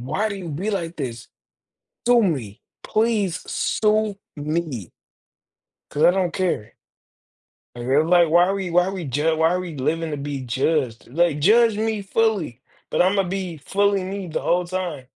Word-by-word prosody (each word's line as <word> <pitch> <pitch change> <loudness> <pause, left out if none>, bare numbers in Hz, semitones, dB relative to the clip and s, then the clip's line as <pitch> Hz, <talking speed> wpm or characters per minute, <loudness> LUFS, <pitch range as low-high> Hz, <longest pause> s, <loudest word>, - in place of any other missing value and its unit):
"Why 155 - -1
do 200 - -4
you 180 -3 -7
be 180 +9 -3
like 170 -4 -3
this?" 120 -5 -5 0.8
"Sue 245 -1 +6
me, 125 - -2 0.2
please 215 -6 +1
sue 215 -1 +1 0.2
me 150 - -3 1.0
'Cause 150 - -1
I 175 - +8
don't 180 -2 0
care." 170 - -2 1.0
And 120 +1 -5
they're 145 +3 +4
like, 175 0 +4
"Why 175 +3 +5
are 195 - 0
we 190 -3 -3
why 175 +1 +4
are 190 - -3
we 190 -3 -5
ju 150 +4 +1
why 160 +1 +3
are 180 - 0
we 180 -3 -6
living 155 +4 -1
to 150 - -2
be 140 -1 -4
judged?" 130 0 -1
Like, 155 +2 +1
judge 220 +6 +5
me 220 -1 -1
fully, 195 - 0 0.3
but - - +2
I'm 190 +3 +2
gonna 195 - +2
be 185 -3 -3
fully 200 +5 +1
me 190 0 -5
the 160 - -3
whole 180 +1 +1
time. 175 -7 -4
175 Hz, 180 wpm, -22 LUFS, 145-195 Hz, 1.0 s, I